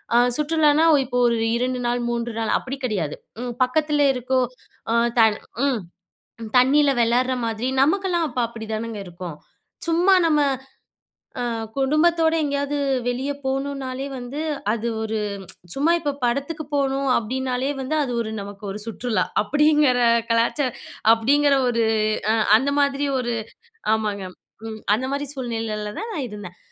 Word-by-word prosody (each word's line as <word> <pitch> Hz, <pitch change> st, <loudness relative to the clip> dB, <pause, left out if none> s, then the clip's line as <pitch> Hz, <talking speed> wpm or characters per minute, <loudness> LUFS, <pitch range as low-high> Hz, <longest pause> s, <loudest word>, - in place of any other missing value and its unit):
அ -, -, +7 dB, 0.2 s
சுற்றுலான்னா, 305 Hz, 0 st, +3 dB
ஒ -, -, +7 dB
இப்போ 245 Hz, 0 st, -3 dB
ஒரு 235 Hz, -, +2 dB, 0.2 s
2 250 Hz, +1 st, -1 dB
நாள், 240 Hz, 0 st, 0 dB
3 235 Hz, 0 st, -2 dB
நாள், 225 Hz, -1 st, -1 dB
அப்படி 265 Hz, +1 st, -5 dB
கெடையாது. 185 Hz, -11 st, -2 dB, 0.3 s
ம் 245 Hz, -1 st, -4 dB
பக்கத்தில 295 Hz, +3 st, +1 dB
இருக்கோ 255 Hz, +1 st, 0 dB, 0.5 s
அ -, -, +2 dB, 0.3 s
தண் 220 Hz, -2 st, +5 dB, 0.3 s
ம் 265 Hz, -5 st, +1 dB, 0.8 s
தண்ணியில 275 Hz, +3 st, +5 dB
வெளாடுற 245 Hz, +2 st, +2 dB
மாதிரி 225 Hz, +1 st, -2 dB
நமக்கெல்லாம் 345 Hz, +3 st, +2 dB
அப்ப 250 Hz, -3 st, -4 dB
அப்படி 225 Hz, -1 st, -8 dB
தானங்க 220 Hz, 0 st, -3 dB
இருக்கும். 175 Hz, -2 st, -7 dB, 0.5 s
சும்மா 345 Hz, +4 st, +4 dB
நம்ம 305 Hz, -2 st, +3 dB, 1.0 s
அ -, -, -1 dB, 0.3 s
குடும்பத்தோடு 320 Hz, +4 st, +3 dB
எங்கேயாவது 285 Hz, 0 st, -1 dB, 0.3 s
வெளிய 260 Hz, +3 st, -1 dB
போகணும்னாலே 270 Hz, 0 st, -3 dB
வந்து, 250 Hz, +4 st, -6 dB, 0.3 s
அது 230 Hz, +1 st, -2 dB
ஒரு 220 Hz, 0 st, -2 dB, 0.6 s
சும்மா 290 Hz, +5 st, +2 dB
இப்ப 290 Hz, -4 st, -2 dB
படத்துக்கு 280 Hz, +6 st, -2 dB
போகணும் 275 Hz, -1 st, 0 dB
அப்படீன்னாலே 255 Hz, +3 st, -2 dB
வந்து, 265 Hz, +4 st, -2 dB
அது 250 Hz, -3 st, -3 dB
ஒரு 220 Hz, -1 st, -4 dB
நமக்கு 200 Hz, +1 st, -9 dB
ஒரு 210 Hz, +2 st, -6 dB
சுற்றுலா. 230 Hz, 0 st, -1 dB, 0.2 s
அப்படீங்கிற 295 Hz, -1 st, +3 dB, 0.3 s
கலாச்சா 235 Hz, +5 st, +2 dB, 0.5 s
அப்படீங்கிற 280 Hz, +5 st, +3 dB
ஒரு 230 Hz, -1 st, +1 dB, 0.5 s
அ -, -, +2 dB, 0.2 s
அந்த 275 Hz, +4 st, -1 dB
மாதிரி 280 Hz, 0 st, +1 dB
ஒரு 240 Hz, -1 st, -2 dB, 0.6 s
ஆமாங்க, 210 Hz, -3 st, -2 dB, 0.4 s
ம். 220 Hz, -1 st, -7 dB, 0.2 s
அந்த 255 Hz, +4 st, -3 dB
மாரி 285 Hz, 0 st, -2 dB
சூழ்நிலையில 225 Hz, -5 st, -3 dB
தான் 450 Hz, +2 st, -5 dB
நான் 285 Hz, -7 st, -2 dB
இருந்தேன். 200 Hz, -4 st, -9 dB
255 Hz, 140 wpm, -23 LUFS, 230-290 Hz, 1.0 s, அ